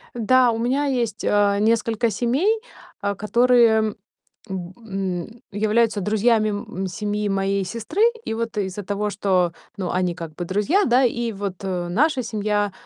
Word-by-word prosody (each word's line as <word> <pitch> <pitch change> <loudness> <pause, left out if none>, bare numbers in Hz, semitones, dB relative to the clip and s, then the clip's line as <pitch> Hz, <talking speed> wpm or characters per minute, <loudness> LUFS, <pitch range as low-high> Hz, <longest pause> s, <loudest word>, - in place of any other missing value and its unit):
Да, 245 +2 +4
у 225 - -2
меня 260 +5 0
есть, 235 -6 -1
э, 205 -1 +3
несколько 230 +1 +2
семей, 265 - +1 0.4
а, 200 0 -1
которые, 220 0 +3 0.5
м, 185 -1 -5
н 195 -5 -3
м, 230 +2 -17
являются 215 +1 +1
друзьями, 215 +2 +2
м, 195 -2 -4
семьи 210 +2 -2
моей 195 0 0
сестры. 230 - -3 0.2
И - - -2
вот 230 -1 -3
из-за 200 0 -3
того, 205 +2 -2
что, 185 -3 +1 0.3
ну, 185 -3 -2
они 180 -1 0
как 165 -3 -7
бы 175 - -4
друзья, 210 - +2
да, 250 +2 +4
и 235 -1 0
вот 200 -1 -4
наша 195 - 0
семья, 210 -2 -1
210 Hz, 155 wpm, -22 LUFS, 195-235 Hz, 0.5 s, Да